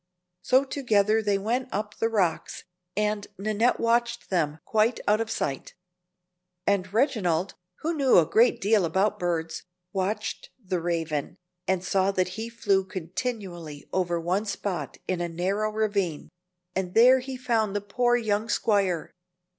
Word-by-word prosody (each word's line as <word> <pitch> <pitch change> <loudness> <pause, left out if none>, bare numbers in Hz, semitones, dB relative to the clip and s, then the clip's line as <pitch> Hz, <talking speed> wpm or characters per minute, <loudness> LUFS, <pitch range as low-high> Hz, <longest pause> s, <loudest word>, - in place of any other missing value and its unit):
So 260 +1 +4
together 220 -6 +2
they 205 -2 +1
went 240 +6 -1
up 210 +1 -3
the 225 - +2
rocks, 185 -8 -1 0.3
and 210 -1 0
Nannette 215 +4 +1
watched 235 0 0
them 155 -5 +1
quite 220 +2 +2
out 215 +2 +4
of 225 - -3
sight. 135 -9 -3 0.9
And 185 -2 +1
Reginald, 200 - +1 0.3
who 330 +2 0
knew 275 -5 +4
a 170 - +6
great 230 +9 +3
deal 205 0 +3
about 190 +5 +1
birds, 165 -2 -2 0.3
watched 205 +2 -2
the 185 -6 -3
Raven, 165 -4 -2 0.3
and 185 -1 +1
saw 190 +1 +2
that 185 -1 +1
he 220 +5 -5
flew 205 -4 +1
continually 185 - -5
over 175 -2 0
one 180 +5 0
spot 190 -7 -3
in 185 -2 -1
a 175 - -2
narrow 195 +6 -1
ravine; 200 -7 -1 0.5
and 185 -1 -2
there 250 +3 +7
he 260 0 -6
found 225 -5 0
the - - +2
poor 240 +5 +1
young 215 -1 -1
squire. 195 -6 +1
205 Hz, 145 wpm, -26 LUFS, 180-225 Hz, 0.9 s, there